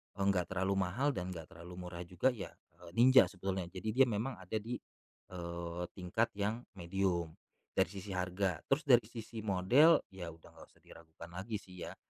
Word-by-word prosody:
enggak 100 -3 +2
terlalu 95 +1 0
mahal 135 +10 +1
dan 90 -6 -4
enggak 80 -2 -9
terlalu 85 +2 -10
murah 85 -1 -7
juga, 90 +9 +2
ya, 105 -6 -6 0.3
eee, 85 - -12
Ninja 130 +2 +8
sebetulnya. 95 -2 -3
Jadi 110 +4 -4
dia 130 +3 +5
memang 115 0 -2
ada 95 +4 -6
di, 115 +3 -2 0.5
eee, 85 -1 -4
tingkat 95 +5 0
yang 110 +4 0 0.2
medium, 85 -2 0 0.4
dari 95 - +4
sisi 100 0 -7
harga. 90 -1 0
Terus 140 +4 +2
dari 120 -6 +5
sisi 115 -1 -7
model, 110 - +5
ya 90 -3 -6
udah 80 0 -16
nggak - - -14
usah - - -26
diragukan 85 +1 -13
lagi 95 +5 -4
sih, 90 -3 -8
ya. - - -8
95 Hz, 180 wpm, -35 LUFS, 90-115 Hz, 0.5 s, Ninja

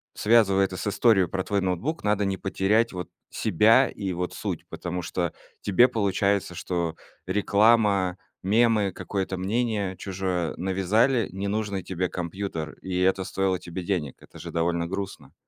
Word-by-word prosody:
связывая 100 -3 +4
это 95 -1 -6
с - - -4
историей 100 -3 +4
про 95 +1 -2
твой 100 -1 0
ноутбук, 95 - -2
надо 105 -1 +1
не 95 -1 -1
потерять 100 +3 +1
вот 90 -1 -5 0.2
себя 110 +6 +4
и 95 -3 -4
вот 90 +1 -3
суть. - - -4
Потому 90 0 -4
что 85 -1 -2 0.3
тебе 110 +6 +5
получается, 100 -4 0
что 85 -2 -2 0.3
реклама, 100 -2 +3 0.3
мемы, 105 -1 +3
какое-то 95 -2 -3
мнение 100 -1 -1
чужое 95 -3 -2
навязали 100 +6 +2
ненужный 100 0 -2
тебе 90 0 -2
компьютер, 85 -3 -4
и 90 -1 -3
это 95 +1 +2
стоило 95 -2 0
тебе 90 +1 -6
денег. 85 -8 -2
Это - - -14
же - - -7
довольно 85 0 0
грустно. 95 +1 -6
95 Hz, 145 wpm, -26 LUFS, 90-105 Hz, 0.3 s, тебе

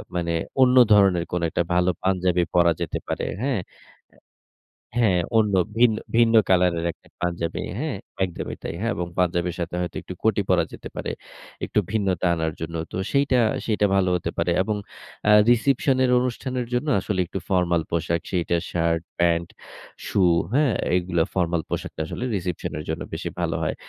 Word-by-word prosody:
মানে 85 -1 -1 0.3
অন্য 125 0 +5 0.2
ধরনের 95 -4 +4
কোনো 90 -1 -1
একটা 85 - 0
ভালো 90 +1 +3
পাঞ্জাবি 90 -2 +2
পড়া 85 -1 +5
যেতে 85 - -2
পারে। - - -2 0.2
হ্যা? 135 -1 +1
এ - - -27 1.3
হ্যা, 115 -4 +4 0.3
অন্য, 105 -2 +2 0.2
ভিন্ন, 115 -2 +5 0.2
ভিন্ন 115 -1 +4
কালার 90 -1 +4
এর 85 - -2
একটা - - -26
পাঞ্জাবি। 85 -1 -2 0.2
হ্যা? 155 +3 -2 0.3
একদমই 90 -2 -5
তাই। - - -4
হ্যাঁ 115 +2 0
এবং 90 - -2
পাঞ্জাবের 90 -1 +1
সাথে 85 0 -4
হয়তো 90 -2 -4
একটু 95 - -8
কটি 110 -2 +3
পরা 90 -3 +4
যেতে - - -8
পারে, - - -3 0.5
একটু - - -1
ভিন্নতা 95 -5 0
আনার 80 -1 -1
জন্য। 80 +1 -4 0.2
তো - - -5 0.2
সেইটা, 140 -3 +3 0.2
সেইটা 105 -2 +2
ভালো 95 -1 +2
হতে 85 - -3
পারে। - - +1
এবং 105 +2 -2 0.5
আ - - +7 0.2
রিসেপশন 130 +2 +3
এর 125 - +2
অনুষ্ঠানের 125 0 -2
জন্য 125 +5 -1
আসলে 95 -1 -2
একটু 95 - -5
ফরমাল 85 -3 +2
পোশাক 85 0 0
সেইটা 85 -1 0
শার্ট, 85 -1 0 0.2
প্যান্ট, 85 -1 +2 0.6
শু - - 0 0.3
হ্যা? 145 +3 +4 0.3
এগুলা 90 -2 +1
ফরমাল 85 -2 0
পোশাকটা - - -4
আসলে 120 - -5
রিসেপশন 90 -2 -4
এর 75 - -6
জন্য 80 - -3
বেশি - - -4
ভালো - - 0
হয়। - - -1
90 Hz, 170 wpm, -24 LUFS, 85-110 Hz, 1.3 s, আ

